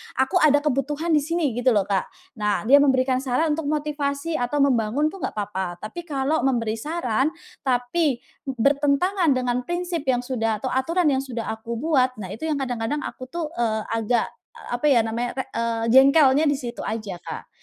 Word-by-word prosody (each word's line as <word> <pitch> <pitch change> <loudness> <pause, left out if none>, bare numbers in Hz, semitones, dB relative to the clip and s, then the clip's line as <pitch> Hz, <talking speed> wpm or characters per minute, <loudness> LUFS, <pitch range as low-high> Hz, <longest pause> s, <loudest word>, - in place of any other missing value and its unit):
aku 265 +8 +2
ada 290 0 +3
kebutuhan 295 +3 -1
di 305 - +5
sini 315 -1 -1
gitu 245 +1 +2
loh 205 - +3
Kak, 195 -1 -1 0.3
nah 210 -1 0
dia 270 +6 +6
memberikan 260 -2 +3
saran 270 +4 0
untuk 300 0 -2
motivasi 295 +1 -2
atau 275 +4 +1
membangun 265 +3 +1
itu 390 - -10
enggak - - -4
apa-apa 190 -4 -3
tapi 340 +11 -7
kalau 285 +1 0
memberi 230 -4 0
saran, 295 0 -1 0.3
tapi, 255 +4 +1 0.3
bertentangan 280 - +2
dengan 250 -1 0
prinsip 345 -4 -3
yang 250 -1 +2
sudah 225 -4 -1
atau 260 - -1
aturan 330 +7 +1
yang 265 - +1
sudah 240 -4 -5
aku 220 +1 -5
buat 260 -2 +2
nah 190 -3 -7
itu 315 +8 -5
yang 310 - 0
kadang-kadang 245 +3 -2
aku 255 - -7
tuh, 315 +2 -4
eee, 220 -2 0
agak, 230 +1 0 0.2
a 475 - -5
apa 245 - -3
ya 270 -6 +5
namanya, 230 +2 -2
re 265 - -2
eee, 230 -1 -2
jengkelnya 275 +3 +6
di 290 - +3
situ 240 -3 -6
aja 215 -4 -4
Kak, 175 - -8
265 Hz, 185 wpm, -23 LUFS, 230-300 Hz, 0.3 s, dia